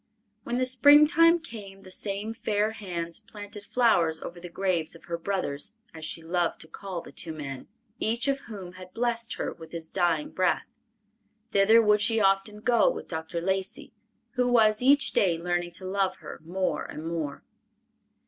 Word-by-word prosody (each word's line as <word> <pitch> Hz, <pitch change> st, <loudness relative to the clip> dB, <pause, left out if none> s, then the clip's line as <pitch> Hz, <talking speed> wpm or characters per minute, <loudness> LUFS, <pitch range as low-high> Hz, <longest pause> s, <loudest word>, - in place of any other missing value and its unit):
When 240 Hz, -, -2 dB
the 255 Hz, -, +2 dB
springtime 300 Hz, +6 st, +6 dB
came, 200 Hz, -, -9 dB
the 185 Hz, -, -12 dB
same 205 Hz, +3 st, -1 dB
fair 215 Hz, -1 st, 0 dB
hands 175 Hz, -6 st, -4 dB
planted 210 Hz, -1 st, -9 dB
flowers 175 Hz, -10 st, +3 dB
over 175 Hz, +2 st, -8 dB
the 175 Hz, 0 st, -8 dB
graves 170 Hz, -3 st, -1 dB
of 165 Hz, -, -15 dB
her 170 Hz, 0 st, -3 dB
brothers, 180 Hz, -3 st, -2 dB, 0.2 s
as 160 Hz, -1 st, -10 dB
she 165 Hz, -, -4 dB
loved 170 Hz, +1 st, 0 dB
to -, -, -8 dB
call 185 Hz, 0 st, -6 dB
the -, -, -12 dB
two 165 Hz, -, -2 dB
men, 140 Hz, -4 st, -7 dB, 0.3 s
each 235 Hz, +4 st, 0 dB
of 275 Hz, 0 st, +1 dB
whom 195 Hz, -5 st, -7 dB
had 185 Hz, 0 st, -13 dB
blessed 235 Hz, 0 st, -1 dB
her -, -, -3 dB
with 160 Hz, -1 st, -13 dB
his 165 Hz, -1 st, -6 dB
dying 170 Hz, -4 st, 0 dB
breath. 185 Hz, -1 st, +1 dB, 0.9 s
Thither 220 Hz, +3 st, +6 dB
would 210 Hz, -1 st, +4 dB
she 225 Hz, +1 st, +3 dB
often 195 Hz, +1 st, +1 dB
go 235 Hz, 0 st, +4 dB
with -, -, -5 dB
Dr. 160 Hz, 0 st, -4 dB
Lacey, 190 Hz, +2 st, -2 dB, 0.4 s
who 250 Hz, -1 st, +1 dB
was 220 Hz, -3 st, +4 dB
each 275 Hz, +2 st, +4 dB
day 175 Hz, -4 st, +2 dB
learning 175 Hz, 0 st, -2 dB
to 190 Hz, -, -3 dB
love 190 Hz, 0 st, 0 dB
her -, -, -10 dB
more 185 Hz, +3 st, -1 dB
and 155 Hz, -, -7 dB
more. 160 Hz, -4 st, -4 dB
195 Hz, 175 wpm, -27 LUFS, 170-225 Hz, 0.9 s, springtime